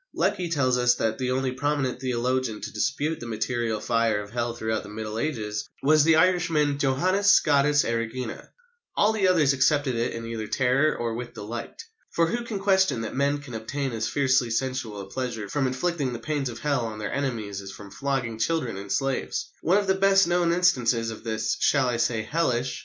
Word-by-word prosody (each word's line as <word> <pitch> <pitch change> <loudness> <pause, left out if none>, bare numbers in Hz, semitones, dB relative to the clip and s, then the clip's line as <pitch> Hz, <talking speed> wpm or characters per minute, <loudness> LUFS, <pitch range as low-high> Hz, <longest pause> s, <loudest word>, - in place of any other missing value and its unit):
Lecky 180 -2 0
tells 130 -6 +1
us 120 0 +4
that 110 +1 -1
the 130 -1 -1
only 130 0 0
prominent 135 -1 -1
theologian 125 -2 -1
to - - -6
dispute 150 +3 -1
the 120 - -7
material 115 0 -2
fire 115 -2 +1
of 105 0 -8
Hell 120 0 -2
throughout 110 -1 -2
the - - -11
Middle 110 +1 -5
Ages 110 -8 -3
was 155 +1 +5
the 160 +1 +5
Irishman 160 -5 +2
Johannes 185 +9 +2
Scotus 145 -4 +4
Erigena. 115 +1 -3 0.5
All 215 +2 +4
the 200 -3 +2
others 155 -7 +4
accepted 140 0 +2
it 115 0 -1
either 115 -1 -5
in - - -11
terror 135 +4 +2
or 115 -1 -2
with 120 +1 -6
delight. 115 - -7 0.3
For 165 - +2
who 235 +8 -2
can 230 -3 -4
question 190 - +2
that 110 - -5
men 140 +1 +1
can 135 -4 -10
obtain 135 +5 -3
as 115 -1 -2
fiercely 130 -3 +2
sensual 115 -3 -2
a - - -7
pleasure 115 0 -4
from 135 +5 0
inflicting 140 0 -1
the - - -4
pains 145 0 -2
of 115 - -7
Hell 140 -1 0
on 110 -1 -7
their 105 -1 -4
enemies 110 -8 -3
as 95 - -9
from 100 0 -11
flogging 125 -2 -2
children 125 -5 -1
and 100 0 -7
slaves? 135 -1 -1
One 180 +5 +3
of 205 - +1
the 190 - +3
best 195 0 +4
known 175 -1 +2
instances 125 -10 +2
of 110 - -9
this 110 -1 -1
shall 135 -3 +3
I 120 -1 0
say, 115 -1 0
hellish? 130 -3 -1
130 Hz, 200 wpm, -26 LUFS, 115-150 Hz, 0.5 s, was